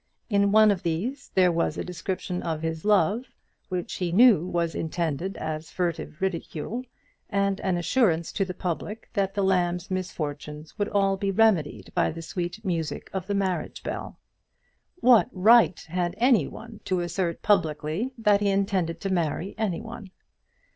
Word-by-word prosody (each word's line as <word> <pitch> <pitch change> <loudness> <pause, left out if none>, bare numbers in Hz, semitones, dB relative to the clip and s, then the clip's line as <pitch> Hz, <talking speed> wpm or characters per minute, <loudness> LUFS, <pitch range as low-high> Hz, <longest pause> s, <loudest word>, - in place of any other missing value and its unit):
In 200 0 +3
one 215 0 +6
of 190 -3 -1
these 220 - -3
there 185 -1 +5
was 170 0 0
a - - -2
description 180 0 -4
of 160 -1 -3
his 160 -1 -3
love, 210 +3 +3 0.4
which 180 -2 -3
he 180 -2 -1
knew 200 -3 +6
was 170 -2 -1
intended 165 +2 -2
as 155 0 -4
furtive 175 -2 -3
ridicule, 190 +5 -3 0.5
and 200 -1 0
an 185 -2 0
assurance 170 -2 +1
to 200 - 0
the 185 -1 -5
public 185 +5 -4
that 195 -2 0
the 200 - +1
lamb's 180 -1 +1
misfortunes 150 -4 -5
would 205 - 0
all 195 -1 +2
be 195 +1 -1
remedied 195 -7 +2
by - - +2
the 165 +1 -7
sweet 180 +5 -5
music 165 -4 -3
of 190 -1 -3
the 200 - -1
marriage 190 -3 -2
bell. - - -5 0.8
What 240 -1 +6
right 215 -1 +5
had 175 +1 -2
any 235 - +4
one 225 0 -10
to 185 -2 0
assert 175 0 -2
publicly 170 - +1
that 210 -2 +3
he 205 - +2
intended 195 -4 0
to 195 -1 -1
marry 170 +2 -1
any 205 -6 -1
one? 225 -3 -9
185 Hz, 160 wpm, -26 LUFS, 170-205 Hz, 0.8 s, one